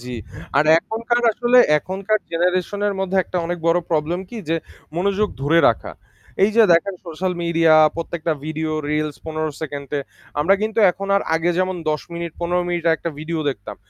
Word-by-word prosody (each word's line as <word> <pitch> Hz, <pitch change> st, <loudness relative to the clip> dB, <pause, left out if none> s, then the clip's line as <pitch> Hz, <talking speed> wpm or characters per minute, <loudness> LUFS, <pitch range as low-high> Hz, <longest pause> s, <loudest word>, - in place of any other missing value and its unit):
জী। 125 Hz, 0 st, -6 dB, 0.4 s
আর 150 Hz, -, +4 dB
এখনকার 230 Hz, +5 st, -1 dB
আসলে 245 Hz, +2 st, +3 dB, 0.2 s
এখনকার 195 Hz, +5 st, -1 dB
generation 180 Hz, +4 st, 0 dB
এর 200 Hz, -, -2 dB
মধ্যে 195 Hz, 0 st, -1 dB
একটা 180 Hz, -, -5 dB
অনেক 175 Hz, 0 st, -3 dB
বড় 170 Hz, +1 st, +4 dB
problem 165 Hz, +3 st, 0 dB
কী 235 Hz, -, -7 dB
যে, 165 Hz, -, +1 dB, 0.4 s
মনোযোগ 200 Hz, +3 st, +1 dB
ধরে 160 Hz, +4 st, +3 dB
রাখা। -, -, -2 dB, 0.5 s
এই 210 Hz, -, +3 dB
যে 230 Hz, -, +8 dB
দেখেন, 170 Hz, +4 st, +2 dB
social 180 Hz, +3 st, -2 dB
media 165 Hz, -1 st, +3 dB, 0.2 s
প্রত্যেকটা 165 Hz, -1 st, -2 dB
ভিডিও 155 Hz, 0 st, -3 dB, 0.2 s
reels 150 Hz, -1 st, -1 dB
১৫ 155 Hz, 0 st, -2 dB
সেকেন্ডে। 145 Hz, -1 st, -4 dB, 0.4 s
আমরা 190 Hz, +6 st, +4 dB
কিন্তু 220 Hz, +1 st, -2 dB
এখন 195 Hz, +3 st, -7 dB
আর 200 Hz, -, +1 dB
আগে 165 Hz, +2 st, +1 dB
যেমন 185 Hz, 0 st, 0 dB
১০ 150 Hz, -, -2 dB
মিনিট, 170 Hz, 0 st, -4 dB
১৫ 175 Hz, +1 st, 0 dB
মিনিট 175 Hz, -1 st, -2 dB
আর 160 Hz, -, +4 dB
একটা 170 Hz, -, -4 dB
ভিডিও 160 Hz, +1 st, -3 dB
দেখতাম। 100 Hz, -7 st, -8 dB
170 Hz, 175 wpm, -21 LUFS, 155-195 Hz, 0.5 s, যে